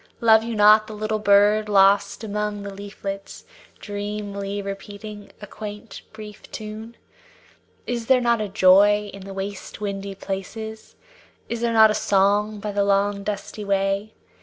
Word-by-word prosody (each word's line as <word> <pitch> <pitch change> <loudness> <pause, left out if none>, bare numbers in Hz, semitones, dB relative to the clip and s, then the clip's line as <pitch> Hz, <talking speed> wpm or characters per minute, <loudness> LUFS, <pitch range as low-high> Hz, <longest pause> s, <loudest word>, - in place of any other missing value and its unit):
Love 220 -1 +5
you 230 0 -4
not 215 +1 +6
the 215 - -8
little 215 +1 -2
bird 210 +1 +4
lost 200 +2 +3
among 210 -1 -3
the 200 -1 -7
leaflets, 195 0 -7 0.3
Dreamily 205 -1 -5
repeating 205 +1 -8
a - - -6
quaint, 210 +1 -9
brief 215 -1 -11
tune? 220 +2 -8 0.9
Is 235 -2 -3
there 260 -1 +5
not 235 -2 +1
a 210 - -3
joy 205 +2 +4
in 195 -1 -10
the 195 - -8
waste 195 0 -6
windy 200 -1 -4
places; 220 +3 -7 0.5
Is 235 0 -3
there 235 -1 0
not 220 -1 +7
a - - +1
song 205 +1 +1
by 210 +1 -4
the 200 0 +1
long 200 0 +1
dusty 210 +1 -5
way? 195 +1 -1
205 Hz, 150 wpm, -23 LUFS, 200-215 Hz, 0.9 s, not